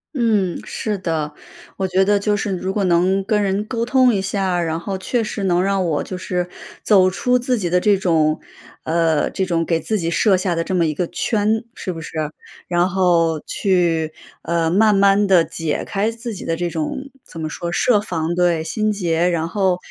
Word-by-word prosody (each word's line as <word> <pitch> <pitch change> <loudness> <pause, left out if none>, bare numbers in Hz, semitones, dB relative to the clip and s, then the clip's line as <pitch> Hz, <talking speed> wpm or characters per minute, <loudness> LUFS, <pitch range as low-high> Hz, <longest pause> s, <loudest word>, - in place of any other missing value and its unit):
嗯， 215 -8 +1
是 210 -2 -3
的。 160 -5 -2 0.4
我 190 -1 -1
觉 185 +1 +2
得 205 +1 +3
就 210 +1 +1
是 205 0 -2
如 190 +2 -3
果 205 - 0
能 185 +2 +2
跟 210 0 +1
人 200 0 0
沟 230 +1 -2
通 255 -1 +4
一 195 - 0
下 195 0 -1
儿， 175 -1 0
然 160 0 -1
后 190 +3 -4
确 230 +4 -1
实 205 -2 -4
能 180 0 +2
让 195 -1 +1
我 150 -3 0
就 185 - -6
是 180 -1 -3 0.3
走 190 -3 +5
出 250 +6 +1
自 250 0 0
己 180 -5 -2
的 180 - +3
这 205 +2 +3
种 160 -5 +1 0.4
呃， 165 -1 +1
这 190 - -2
种 170 -2 0
给 165 -1 +1
自 215 +5 -1
己 165 -2 -2
设 200 +1 +3
下 185 -1 0
的 165 0 -1
这 190 - -2
么 170 -2 +3
一 155 - 0
个 170 +3 -2
圈， 215 +3 0
是 185 - -4
不 165 - -7
是？ 150 - -8 0.6
然 175 +1 +2
后 170 -4 +2
去， 170 -5 +1 0.3
呃， 165 -1 0
慢 210 +4 +4
慢 200 +1 +4
地 180 -4 +5
解 165 -1 -3
开 210 +3 -1
自 230 0 -6
己 - - -8
的 165 0 -2
这 175 0 -1
种 170 - -4
怎 165 - -11
么 155 - -2
说 170 +3 -5
设 210 +3 +3
防。 170 -4 -2
对， 175 -2 +2
心 215 +6 0
结。 175 -4 +1
然 165 -2 -1
后 190 -1 +1
185 Hz, 225 characters per minute, -20 LUFS, 170-205 Hz, 0.6 s, 走